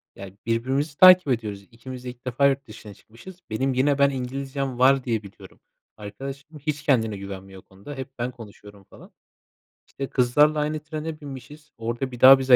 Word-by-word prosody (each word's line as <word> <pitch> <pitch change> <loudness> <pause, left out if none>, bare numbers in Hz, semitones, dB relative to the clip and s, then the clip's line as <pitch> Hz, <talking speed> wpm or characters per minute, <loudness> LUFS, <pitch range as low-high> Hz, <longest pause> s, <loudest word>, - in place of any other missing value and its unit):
Ya, 95 -1 -9
birbirimizi 135 +6 -1
takip 185 -3 +8
ediyoruz. 105 -5 -2
İkimiz 125 +2 -9
de 125 - -5
ilk 125 +1 -12
defa 130 +3 +3
yurt 135 0 -1
dışına 105 -3 -11
çıkmışız. 145 - -15
Benim 130 +5 0
yine 140 +2 +2
ben 140 0 +5
İngilizcem 135 0 -4
var 135 0 +5
diye 115 -4 -1
biliyorum. 100 - -14 0.4
Arkadaşım 135 +8 -8
hiç 145 0 -3
kendine 110 -8 +1
güvenmiyor 95 -1 -9
o - - -40
konuda. 100 +10 -11
Hep 135 +1 -6
ben 125 +2 -2
konuşuyorum 105 -4 -14
falan. - - -16 0.8
İşte, 135 -1 -6
kızlarla 145 +5 +3
aynı 150 +1 -1
trene 155 0 -6
binmişiz, 145 +2 -10
orada 120 +3 -3
bir 125 - -9
daha 135 +1 +9
bize 130 -1 +6
130 Hz, 175 wpm, -24 LUFS, 115-140 Hz, 0.8 s, daha